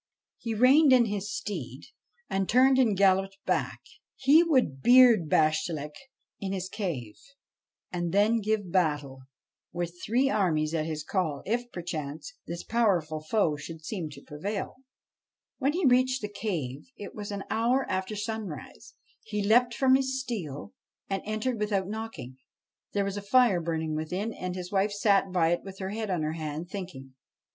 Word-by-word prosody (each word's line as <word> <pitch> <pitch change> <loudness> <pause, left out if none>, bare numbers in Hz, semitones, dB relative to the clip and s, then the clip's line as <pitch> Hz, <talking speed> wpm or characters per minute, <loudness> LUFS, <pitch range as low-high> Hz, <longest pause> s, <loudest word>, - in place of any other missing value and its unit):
He 230 -1 -3
reined 270 +6 +6
in 250 -2 +6
his 205 -1 -3
steed, 140 - -5 0.4
and 195 -1 -1
turned 260 +2 +5
and 220 -7 +3
galloped 195 0 +3
back. - - -1 0.3
He 280 +5 +6
would 255 - +1
beard 240 - +6
Bashtchelik 155 -1 +1 0.5
in 195 -1 -3
his 190 -1 -4
cave, 160 - -4 0.7
and 175 -1 -2
then 210 +4 +3
give 210 -3 -1
battle, 145 -7 0 0.5
with 175 0 -3
three 250 +5 +2
armies 160 - +1
at 160 -1 -1
his 155 -2 -4
call, 160 -7 -2
if, 240 +3 -2
perchance, 160 - -5
this 170 0 -5
powerful 180 -10 +1
foe 155 -1 +1
should 160 +2 -9
seem 175 -6 -4
to 140 - -13
prevail. 195 +10 -5 0.8
When 280 +1 +1
he 355 0 0
reached 255 -1 +3
the 210 - -3
cave 155 - -4
it 200 - -8
was 205 -1 -7
an 200 -1 -4
hour 240 +4 +2
after 190 +3 -2
sunrise. 210 - -6 0.3
He 210 -2 -3
leapt 235 +3 +4
from 265 -1 +4
his 265 0 +2
steed 235 - -4 0.6
and 195 -1 -1
entered 220 +2 -2
without 205 -3 0
knocking. 215 - -6 0.6
There 200 -1 +1
was 200 0 -3
a - - -3
fire 205 -3 +4
burning 160 -1 -2
within, 180 +8 -3
and 180 0 -5
his 180 -1 -6
wife 200 +1 +1
sat 200 -2 +2
by 170 -3 +2
it 175 - +1
with 195 -1 -10
her 190 -1 -4
head 220 0 -4
on 175 -4 0
her 155 +1 -1
hand, 160 +2 -5
thinking. 170 -10 -7
195 Hz, 165 wpm, -28 LUFS, 165-225 Hz, 0.8 s, reined